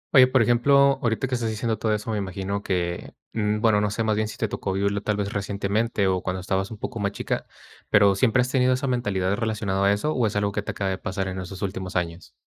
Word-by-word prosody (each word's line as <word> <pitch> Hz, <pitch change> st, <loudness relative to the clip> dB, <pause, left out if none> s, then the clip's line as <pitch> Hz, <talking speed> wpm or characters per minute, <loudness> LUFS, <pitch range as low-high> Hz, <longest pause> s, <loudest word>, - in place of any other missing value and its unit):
Oye, 130 Hz, -1 st, +9 dB
por 130 Hz, -2 st, +3 dB
ejemplo, 135 Hz, +3 st, +4 dB
ahorita 115 Hz, +3 st, 0 dB
que 130 Hz, -, -5 dB
estás 115 Hz, -2 st, 0 dB
diciendo 110 Hz, 0 st, -2 dB
todo 110 Hz, -, 0 dB
eso, 105 Hz, +1 st, -1 dB
me 105 Hz, -, -1 dB
imagino 100 Hz, +1 st, -3 dB
que, 85 Hz, -3 st, -3 dB, 0.2 s
mm, 105 Hz, -1 st, 0 dB
bueno, 110 Hz, -3 st, +4 dB
no 105 Hz, -, +1 dB
sé 110 Hz, +2 st, -2 dB
más 110 Hz, -1 st, +1 dB
bien 110 Hz, 0 st, 0 dB
si -, -, -8 dB
te 110 Hz, -, 0 dB
tocó 95 Hz, -1 st, -3 dB
vivirlo 100 Hz, +1 st, 0 dB
tal 105 Hz, 0 st, -1 dB
vez 100 Hz, 0 st, -2 dB
recientemente 100 Hz, +2 st, -1 dB
o 95 Hz, -1 st, +1 dB
cuando 90 Hz, 0 st, -3 dB
estabas 95 Hz, +1 st, -1 dB
un 110 Hz, -, -8 dB
poco 115 Hz, +2 st, -5 dB
más 100 Hz, 0 st, 0 dB
chica -, -, -3 dB, 0.4 s
pero, 100 Hz, -1 st, +5 dB
¿siempre 115 Hz, +5 st, +3 dB
has 125 Hz, +1 st, -1 dB
tenido 130 Hz, -1 st, +3 dB
esa 135 Hz, +2 st, -3 dB
mentalidad 100 Hz, -7 st, 0 dB
relacionado 105 Hz, -3 st, -1 dB
a 100 Hz, -, +5 dB
eso 125 Hz, +10 st, 0 dB
o 120 Hz, -4 st, +2 dB
es 105 Hz, -, -4 dB
algo 100 Hz, 0 st, +1 dB
que 105 Hz, -, -2 dB
te -, -, -8 dB
acaba 95 Hz, -1 st, -2 dB
de 95 Hz, -, -3 dB
pasar 95 Hz, 0 st, -3 dB
en 95 Hz, 0 st, -5 dB
esos 95 Hz, +2 st, -7 dB
últimos 95 Hz, -1 st, -4 dB
años? 85 Hz, -1 st, -3 dB
105 Hz, 255 wpm, -24 LUFS, 95-115 Hz, 0.4 s, Oye